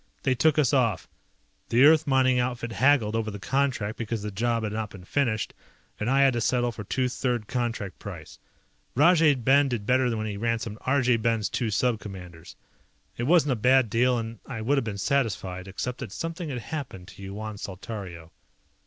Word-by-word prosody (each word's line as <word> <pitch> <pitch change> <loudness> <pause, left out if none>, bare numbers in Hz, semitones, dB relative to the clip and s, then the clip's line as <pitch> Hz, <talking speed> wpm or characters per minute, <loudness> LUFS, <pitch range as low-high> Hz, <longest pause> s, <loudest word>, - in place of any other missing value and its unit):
They 130 - +2
took 155 +4 +2
us 145 -4 +3
off. 115 -8 +1 0.6
The 120 +3 +4
Earth 155 0 +5
mining 130 -2 +3
outfit 120 -1 -2
haggled 125 -3 +3
over 110 -1 -1
the 105 - -6
contract 115 0 -1
because 115 -2 -3
the 105 - -4
job 115 +3 0
had 105 -1 -3
not 110 -1 -3
been 95 -3 -12
finished 110 0 -1 0.5
and 105 - -1
I 135 +1 +4
had 135 -2 +5
to 120 - -1
settle 120 0 +1
for 110 -2 -8
two 130 +5 0
third 125 -3 -2
contract 115 -6 -3
price. 85 -6 -9 0.6
Rajay 160 +1 +5
Ben 135 +3 +3
did 115 -5 -3
better 125 -1 +2
when 110 - -3
he 105 -2 -4
ransomed 115 -1 -2
Arjay 125 -4 +3
Ben's 115 -2 +1
two 120 - -1
Sub 115 +2 +1
Commanders. 90 -5 -10 0.6
It 120 - -3
wasn't 160 -3 +4
a - - +2
bad 125 0 +3
deal 125 +2 +3
and 115 -1 -5
I 115 -4 -5
would 135 +6 +2
have - - -3
been 105 -3 -4
satisfied, 100 -6 -1
except 125 +6 -4
that 120 -7 -6
something 165 - -5
had 130 - -3 0.2
happened 125 - -5
to 100 - -13
Yuan 105 +2 -6
Saltario. 95 -4 -7
115 Hz, 190 wpm, -26 LUFS, 105-130 Hz, 0.6 s, Earth